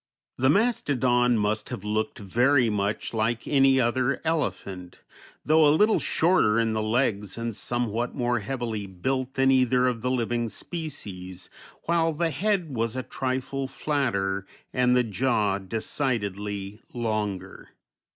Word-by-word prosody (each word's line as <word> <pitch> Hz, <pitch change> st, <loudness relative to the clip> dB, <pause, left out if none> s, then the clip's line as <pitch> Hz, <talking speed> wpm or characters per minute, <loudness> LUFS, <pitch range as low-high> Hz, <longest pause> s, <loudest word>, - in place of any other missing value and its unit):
The 130 Hz, +1 st, +3 dB
mastodon 130 Hz, -, +2 dB
must 105 Hz, +1 st, -1 dB
have 95 Hz, -, -6 dB
looked 110 Hz, +1 st, -1 dB
very 120 Hz, +4 st, +2 dB
much 105 Hz, +2 st, -2 dB
like 115 Hz, +1 st, -1 dB
any 135 Hz, -2 st, +4 dB
other 130 Hz, +2 st, +1 dB
elephant, 100 Hz, -, -3 dB, 0.5 s
though 155 Hz, +1 st, +5 dB
a -, -, +6 dB
little 215 Hz, +3 st, +4 dB
shorter 160 Hz, -11 st, +3 dB
in 115 Hz, -1 st, +1 dB
the 110 Hz, -, 0 dB
legs 110 Hz, -3 st, 0 dB
and 115 Hz, -2 st, -3 dB
somewhat 120 Hz, 0 st, -2 dB
more 120 Hz, -2 st, 0 dB
heavily 110 Hz, -2 st, -4 dB
built 130 Hz, +8 st, -3 dB
than 135 Hz, 0 st, +4 dB
either 125 Hz, -1 st, +3 dB
of 125 Hz, -3 st, 0 dB
the 125 Hz, -, -1 dB
living 120 Hz, -2 st, -1 dB
species, 95 Hz, -, -6 dB, 0.3 s
while 165 Hz, -1 st, +1 dB
the 165 Hz, +2 st, 0 dB
head 180 Hz, -1 st, 0 dB
was 115 Hz, +1 st, -1 dB
a 130 Hz, -, -2 dB
trifle 130 Hz, +1 st, -3 dB
flatter 100 Hz, -10 st, -1 dB, 0.3 s
and 125 Hz, 0 st, +3 dB
the 125 Hz, -, +4 dB
jaw 105 Hz, -2 st, 0 dB
decidedly 105 Hz, -2 st, -2 dB
longer. 105 Hz, -5 st, -3 dB
120 Hz, 135 wpm, -26 LUFS, 105-135 Hz, 0.5 s, a